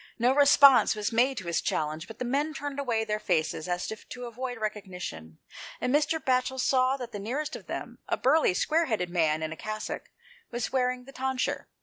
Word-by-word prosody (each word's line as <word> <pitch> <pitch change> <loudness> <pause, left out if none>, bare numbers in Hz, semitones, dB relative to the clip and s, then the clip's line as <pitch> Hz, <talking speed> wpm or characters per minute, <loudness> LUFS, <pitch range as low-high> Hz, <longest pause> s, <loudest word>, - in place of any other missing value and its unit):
No 245 +2 +3
response 280 -5 +7
was 210 +1 -2
made 250 +3 +2
to 190 - -5
his 170 -1 0
challenge, 155 +3 -2
hut 225 - -10
the 250 - -3
men 290 +5 0
turned 285 0 -4
away 235 -5 0
their 210 0 -1
faces 170 -5 0
as 175 +2 -2
if 220 - -9
to 250 0 -7
avoid 245 +1 -5
recognition, 180 - -6 0.4
and 250 - 0
Mr. 300 +2 +2
Batchel 260 -2 0
saw 255 +1 +3
that 245 -3 -7
the 205 - -5
nearest 285 +9 -3
of - - -10
them, - - -6
a - - +1
burly, 275 - +3
square 320 - +2
headed 195 - -1
man 160 -3 +1
in 155 - -3
a - - -5
cassock, 215 +4 -5 0.4
was 240 +1 -3
wearing 250 -1 0
the 275 - -12
tonsure. 265 -1 -2
245 Hz, 205 wpm, -28 LUFS, 195-265 Hz, 0.4 s, response